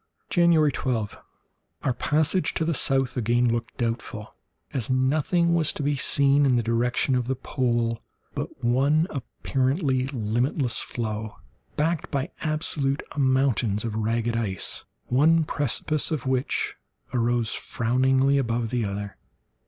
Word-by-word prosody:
January 170 -4 +4
12.—Our 125 +1 -5
passage 155 +8 +1
to 160 - 0
the 165 - 0
south 135 -2 +1
again 120 0 +2
looked 115 0 -2
doubtful, 115 -2 -4 0.4
as 125 -6 -2
nothing 155 +6 +2
was 165 -3 +2
to - - -4
be 145 +1 +1
seen 140 +1 +3
in 135 -3 +3
the 120 - +1
direction 120 +4 +1
of 125 -2 0
the 130 - 0
pole 120 -3 -1 0.3
but - - -6
one 140 +7 +3
apparently 135 0 -1
limitless 120 +1 0
floe, 110 -2 -4 0.4
backed 160 +1 -1
by 140 +5 -2
absolute 150 -3 0
mountains 130 -6 +1
of 115 - -3
ragged 115 +2 -1
ice, 105 -5 0 0.2
one 160 +6 +4
precipice 150 +1 0
of 155 -6 -3
which 130 0 -1 0.4
arose 120 -2 +1
frowningly 130 +3 +1
above 115 -3 -1
the 125 -2 0
other. 100 0 -5
130 Hz, 130 wpm, -25 LUFS, 115-145 Hz, 0.4 s, January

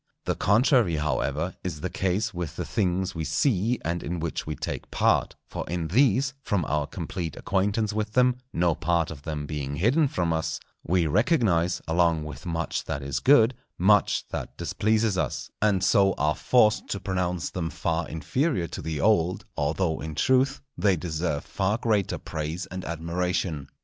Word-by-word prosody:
The - - +1
contrary, 110 - +3
however, 75 +3 -1
is 80 -5 -4
the 90 - -2
case 100 +4 0
with 85 -3 -4
the - - -3
things 95 -3 0
we 80 - -3
see, 105 - +1
and 85 +2 -1
in 85 0 -3
which 80 -1 -3
we 75 - -2
take - - -5
part; - - +2
for - - -4
in 85 -2 -2
these, 135 - +3
from 95 - 0
our 75 0 0
complete 85 0 -5
acquaintance 105 +1 0
with 105 0 -2
them, 125 0 +4
no 85 -1 +2
part 85 0 0
of 75 -3 -9
them 75 -1 -4
being 70 -2 -4
hidden 125 - +3
from 85 -9 0
us, 80 0 -2 0.2
we 90 0 +2
recognize, 90 - +2
along 85 -1 +2
with 75 +3 -8
much 85 -1 -2
that 70 - -3
is 70 -1 -2
good, 120 - +5 0.2
much 105 +3 +3
that - - -5
displeases 110 -2 +1
us, - - -3
and 100 -3 +2
so 95 -1 +4
are 75 -2 +1
forced 110 -4 +3
to 100 - -3
pronounce 90 -3 -2
them 85 -3 -2
far 85 0 -2
inferior 130 - 0
to - - -6
the 80 -2 -3
old, 90 -2 +2
although 80 +3 0
in 80 -1 -5
truth 130 - +2
they 100 -3 +3
deserve 80 -2 -2
far 100 +2 0
greater 110 -5 0
praise 80 +4 -4
and 95 0 -5
admiration. 85 -2 -2
90 Hz, 170 wpm, -26 LUFS, 80-105 Hz, 0.2 s, good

